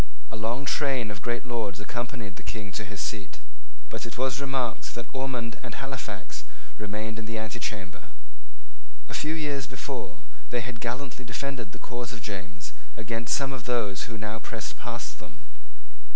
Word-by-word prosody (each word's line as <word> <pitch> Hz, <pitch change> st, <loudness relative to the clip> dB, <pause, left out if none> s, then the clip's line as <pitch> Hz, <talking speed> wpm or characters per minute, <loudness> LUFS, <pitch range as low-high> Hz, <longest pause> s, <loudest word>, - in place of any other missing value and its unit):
A -, -, -1 dB
long 115 Hz, +5 st, +2 dB
train 135 Hz, -7 st, +4 dB
of 105 Hz, -1 st, -4 dB
great 120 Hz, +2 st, +2 dB
lords 110 Hz, -6 st, +1 dB
accompanied 115 Hz, -2 st, -1 dB
the -, -, -7 dB
King 95 Hz, +4 st, -2 dB
to 105 Hz, -, 0 dB
his 105 Hz, -, -4 dB
seat. 100 Hz, -5 st, 0 dB, 0.5 s
But -, -, -2 dB
it 115 Hz, -, -3 dB
was 130 Hz, +1 st, +4 dB
remarked 135 Hz, -4 st, +2 dB
that 120 Hz, -, -1 dB
Ormond 125 Hz, -4 st, +1 dB
and -, -, -3 dB
Halifax -, -, -2 dB, 0.4 s
remained 105 Hz, +2 st, 0 dB
in -, -, -3 dB
the 115 Hz, -, +1 dB
antechamber. 105 Hz, -5 st, -1 dB, 1.0 s
A -, -, -5 dB
few 155 Hz, +2 st, +3 dB
years 145 Hz, -3 st, +2 dB
before 130 Hz, -2 st, -2 dB, 0.3 s
they 120 Hz, -, +4 dB
had 120 Hz, -2 st, -3 dB
gallantly 125 Hz, +2 st, 0 dB
defended 120 Hz, -2 st, 0 dB
the -, -, -6 dB
cause 120 Hz, +2 st, -2 dB
of 110 Hz, -3 st, -5 dB
James 95 Hz, -, -3 dB, 0.2 s
against 115 Hz, +2 st, +3 dB
some 135 Hz, -1 st, +2 dB
of 125 Hz, -3 st, -3 dB
those 105 Hz, -6 st, +4 dB
who 110 Hz, -, -2 dB
now 110 Hz, +1 st, 0 dB
pressed -, -, -1 dB
past -, -, -2 dB
them. -, -, -11 dB
115 Hz, 165 wpm, -32 LUFS, 105-125 Hz, 1.0 s, train